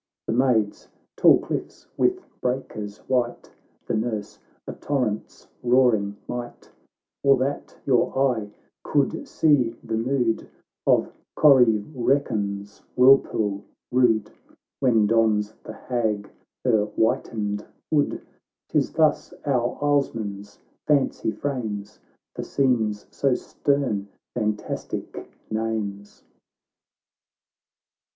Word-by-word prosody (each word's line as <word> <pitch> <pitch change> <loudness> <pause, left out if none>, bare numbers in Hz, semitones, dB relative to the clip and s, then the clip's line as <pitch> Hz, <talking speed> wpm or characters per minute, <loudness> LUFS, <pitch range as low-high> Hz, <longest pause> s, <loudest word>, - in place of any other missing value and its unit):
(The - - -1
Maids— 115 -4 +1 0.3
tall - - +7
cliffs - - -5
with 370 -1 +1 0.2
breakers 110 -5 -3
white, 125 -2 -1 0.3
The - - -2
Nurse 110 -2 -2
— - - -40
a - - -4
torrent's 125 -7 -3
roaring 120 -5 +3
might,) 120 -1 -7 0.5
Or 140 -1 +5
that 135 +3 -3
your 130 -1 +2
eye 125 -6 +1 0.3
could - - 0
see 130 -7 +2
the 115 -2 -2
mood 120 -1 0 0.4
Of - - +3 0.2
Corrievreken's 115 -5 +2 0.2
whirlpool 115 -6 +4 0.3
rude, 120 -4 +3 0.5
When 115 -5 +4
dons 110 -1 +2
the 110 - -8
Hag 110 -4 -2 0.3
her 110 -4 +3
whitened 105 -1 -1 0.2
hood 150 -2 +1 0.2
— - - -66
'Tis - - +1
thus 155 -2 +2
our 125 -4 0
islesmen's 110 -8 -1 0.3
fancy 140 -6 +2
frames, 110 -6 -4 0.3
For - - -5
scenes 115 -6 0
so 135 -3 +1
stern, 130 -11 -1 0.3
fantastic 105 -3 -4 0.2
names." 110 -2 -3
115 Hz, 100 wpm, -24 LUFS, 105-130 Hz, 0.5 s, tall